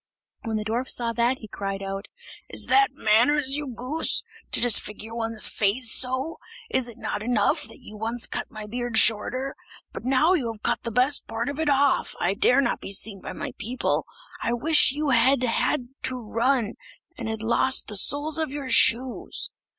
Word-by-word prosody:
When 220 -1 -1
the 210 - -4
dwarf 235 +4 -2
saw 235 -1 +1
that, 240 +2 +1
he 220 - -11
cried 195 -1 -5
out: 195 +1 -5 0.4
"Is - - 0
that 410 0 +4
manners, 260 +6 +2
you 295 0 -4
goose! 255 +5 -1 0.3
to - - +3
disfigure 225 -1 +1
one's 225 -2 0
face 220 +4 0
so? 260 +5 +1 0.3
Is 250 -2 +1
it 235 - -13
not 225 - -4
enough 220 -2 +1
that - - -13
you 215 - -12
once 230 +2 -2
cut - - -5
my 215 -1 -8
beard 240 +1 -3
shorter? 250 +5 +2 0.4
But - - -7
now 270 +7 +3
you 255 -11 0
have 215 -2 -13
cut 240 - 0
the 235 - -5
best 255 +5 +2
part 230 +3 -3
of 285 +1 -6
it 315 -2 +1
off, 280 -1 +2
I 180 - +1
dare 250 +6 +4
not - - -1
be - - -6
seen 200 0 +1
by - - -7
my 285 -2 -5
people. 245 +5 -1 0.4
I 235 - 0
wish 295 +4 +4
you 295 +1 -2
had 260 0 +4
had 245 +1 0 0.2
to 255 - -1
run, 235 0 0 0.4
and 230 -7 -5
had 220 0 -4
lost 260 +3 +2
the 210 - -3
soles 290 +9 +1
of 315 - -1
your 275 -2 -5
shoes!" 245 +2 +2
240 Hz, 190 wpm, -25 LUFS, 220-270 Hz, 0.4 s, that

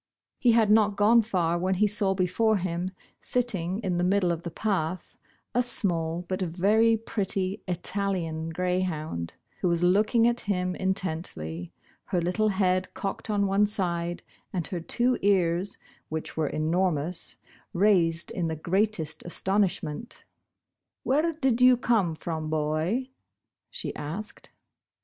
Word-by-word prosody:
He 240 -2 +4
had 220 -2 +4
not 210 -2 +4
gone 225 +3 +6
far 175 -6 0
when 185 +2 0
he 210 +3 +3
saw 200 -2 +2
before 205 +4 +2
him, 180 0 -2 0.3
sitting 195 -8 -1
in 180 -2 0
the - - +1
middle 185 -1 +2
of 170 -1 -3
the 170 - -5
path, 185 -2 -2 0.4
a 245 - +3
small 175 -8 0
but 185 +2 -4
very 205 +6 +3
pretty 195 -3 -2
Italian 180 -3 -1
greyhound, 165 - -2 0.2
who 185 - 0
was 170 0 +1
looking 210 +6 +4
at 240 0 +1
him 180 -3 -1
intently, 160 - -2 0.3
her 180 - 0
little 180 +6 +1
head 185 -2 +1
cocked 215 +3 -4
on 205 -1 +2
one 200 +1 +3
side, 175 -4 -2 0.3
and 175 -4 -2
her 175 +4 -4
two 240 +8 0
ears, 185 -1 +1 0.3
which 160 0 -5
were 155 -2 0
enormous, 165 +1 -1 0.4
raised 170 -4 +2
in 170 -2 -2
the 160 - -2
greatest 170 -2 -1
astonishment* 190 +1 -1 0.4
*' - - -61
Where 305 +5 +2
did 265 -6 0
you 250 0 +7
come 210 -9 +1
from, 155 -1 -4
boy? 155 - -1 0.3
" - - -60
she - - -6
asked. 185 +9 -6
185 Hz, 140 wpm, -27 LUFS, 170-210 Hz, 0.4 s, you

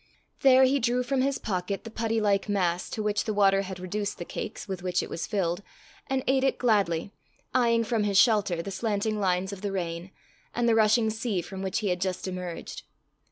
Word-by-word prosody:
There 265 -1 +6
he 270 +2 +4
drew 245 +1 +1
from 265 +1 0
his 275 +1 +1
pocket 195 -1 -3
the 225 - -8
putty 225 0 -1
like 205 -1 +1
mass 180 -3 0
to 215 - -3
which 210 -1 0
the 215 - -2
water 195 -1 +4
had 190 -2 -6
reduced 200 +3 -3
the 175 - -6
cakes 215 +3 -6
with 190 -2 -4
which 180 0 0
it - - -8
was 165 - -3
filled, 180 -3 -1 0.5
and 265 -1 -1
ate 265 0 +2
it 270 - +2
gladly, 200 -7 +1 0.4
eyeing 235 -2 +3
from 225 -2 0
his 200 -2 +1
shelter 200 -7 +4
the 195 - -5
slanting 210 +1 -1
lines 190 0 0
of 195 - -8
the 205 -1 -2
rain, 175 -1 -4 0.5
and 240 0 +1
the 230 - +4
rushing 220 0 +4
sea 220 -3 -2
from 190 +2 -7
which 190 +2 -1
he 205 - 0
had 180 -1 -1
just 185 0 -2
emerged. 180 -2 -6
205 Hz, 210 wpm, -27 LUFS, 185-225 Hz, 0.5 s, There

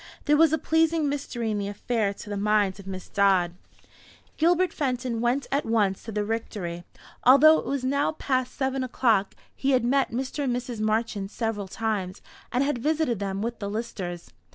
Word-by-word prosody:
There 295 - +4
was 320 0 +5
a 315 - +2
pleasing 320 -1 +2
mystery 270 -5 -2
in 210 - -1
the 200 - -2
affair, 210 0 -1
to 200 - -10
the - - -2
mind 205 -1 +1
of 195 - -11
Miss 185 -1 -6
Dodd. 190 -4 +2 0.8
Gilbert 350 +2 +2
Fenton 250 -4 -2
went 245 +4 +1
at 280 +2 +1
once 210 -4 +1
to 225 - -8
the 210 -1 -1
Rectory, 200 -6 -4 0.4
although 290 +5 +7
it - - -7
was 275 -2 -2
now 280 +3 +1
past 255 -4 -1
seven 265 -1 -1
o'clock. 230 -6 +1 0.2
He 275 0 +1
had 250 -2 +3
met 270 +2 +2
Mr. 260 +4 -3
and 245 -2 0
Mrs. 245 -2 -5
Marchant 215 -2 -1
several 215 -3 -3
times, 200 -3 -3 0.3
and 250 +2 +2
had 280 -3 -1
visited 300 -5 0
them 195 0 -3
with 235 0 -4
the 200 -2 -4
Listers. 200 -6 -5
235 Hz, 185 wpm, -26 LUFS, 205-275 Hz, 0.8 s, although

